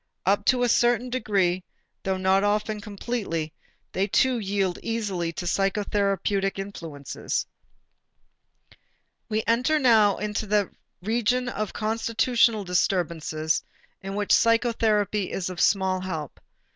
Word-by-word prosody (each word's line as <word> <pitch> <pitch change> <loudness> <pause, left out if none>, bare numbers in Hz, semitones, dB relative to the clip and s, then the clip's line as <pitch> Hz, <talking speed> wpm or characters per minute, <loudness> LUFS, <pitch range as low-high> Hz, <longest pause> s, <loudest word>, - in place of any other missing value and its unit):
Up 200 +2 +2
to 250 -1 +3
a - - +3
certain 240 +1 +2
degree, 190 -7 +1 0.4
though 190 -1 -1
not 190 +1 +2
often 210 +1 0
completely, 200 -6 -4 0.4
they 195 +2 0
too 255 +4 +2
yield 195 -3 -1
easily 200 -7 -2
to 175 - -5
psychotherapeutic 195 0 0
influence. 165 -8 -4 1.8
We 215 0 0
enter 250 +7 +2
now 225 -7 +5
that 210 -1 -1 0.3
region 240 +4 +1
of 215 -3 -4
constitutional 225 0 +1
disturbances 170 -4 0 0.4
in 195 0 -5
which 205 0 -1
psychotherapy 220 -4 +2
is 185 -1 -3
of 180 - -4
small 190 -1 +2
help. 160 -6 -5
205 Hz, 110 wpm, -25 LUFS, 185-225 Hz, 1.8 s, now